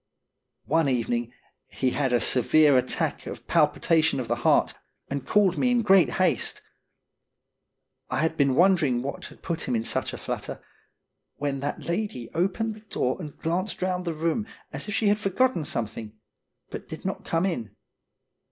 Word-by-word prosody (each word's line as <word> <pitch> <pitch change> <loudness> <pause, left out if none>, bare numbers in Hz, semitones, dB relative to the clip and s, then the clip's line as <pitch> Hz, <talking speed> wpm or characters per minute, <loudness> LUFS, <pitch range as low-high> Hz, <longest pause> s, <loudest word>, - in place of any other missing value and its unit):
One 160 -1 +2
evening 120 -1 -1 0.4
he 130 -1 -1
had 135 -1 0
a 120 - +3
severe 145 +4 +4
attack 125 0 0
of - - -7
pal - - +4
pitation 160 -4 +1
of 125 - -3
the - - 0
heart, - - +3 0.4
and 140 -1 -3
called 200 -4 +3
me 255 - +3
in 245 -1 +2
great 195 -3 +5
haste. 185 -2 0 1.5
I - - 0
had 160 - 0
been 140 -3 +2
wondering 160 -9 +3
what 140 - -5
had - - -13
put 170 -1 -3
him 125 - 0
in 110 - 0
such - - -1
a - - -6
flutter, - - -5 0.8
when 140 -1 -2
that 140 - -4
lady 170 - -3
opened 195 +6 0
the 215 - -12
door 130 - -2
and 150 -4 -8
glanced 180 +4 -2
round 180 -1 -1
the 165 -2 -2
room 165 +7 -1 0.3
as - - -3
if 210 - -3
she 220 - +1
had 205 +1 +3
forgotten 215 -1 +1
something, 110 -3 -3 0.6
but - - -7
did - - -8
not - - -3
come 165 +2 0
in. 115 - -3
160 Hz, 170 wpm, -26 LUFS, 130-190 Hz, 1.5 s, great